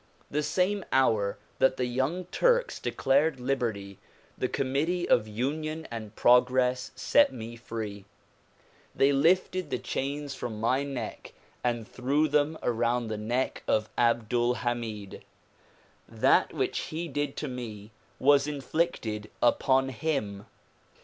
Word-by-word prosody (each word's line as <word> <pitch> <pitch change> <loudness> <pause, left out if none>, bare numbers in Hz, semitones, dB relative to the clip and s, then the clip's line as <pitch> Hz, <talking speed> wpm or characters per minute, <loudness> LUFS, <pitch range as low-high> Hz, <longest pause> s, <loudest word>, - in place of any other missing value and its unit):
The 150 - +1
same 190 +5 0
hour 110 -7 +2 0.2
that 130 0 +3
the 125 - 0
Young 135 +9 -1
Turks - - +2
declared 140 +1 +1
liberty, 115 -7 -2 0.4
the 130 - -1
Committee 145 +8 -1
of 110 -2 +3
Union 155 +8 -3
and 110 -2 -7
Progress 125 +1 +3
set 290 -1 +4
me 115 0 -7
free. 110 -4 -6 0.9
They 135 +1 +4
lifted 175 +4 +2
the - - -1
chains 140 +1 -3
from 115 -5 -5
my 125 +5 +2
neck 135 -6 -6 0.3
and 120 -2 -1
threw 140 +5 +1
them 150 +2 +1
around 120 0 0
the 110 - -3
neck 120 +5 -1
of 110 0 +1
Abdul 120 +1 +2
Hamid. 115 -5 -4 0.9
That - - +3
which - - -1
he 165 +2 -4
did 145 -1 -3
to 150 - -3
me 115 -5 -7 0.3
was 140 +1 +4
inflicted 135 -7 -2
upon 135 +2 +3
him. 110 -7 -3
130 Hz, 125 wpm, -28 LUFS, 115-145 Hz, 0.9 s, set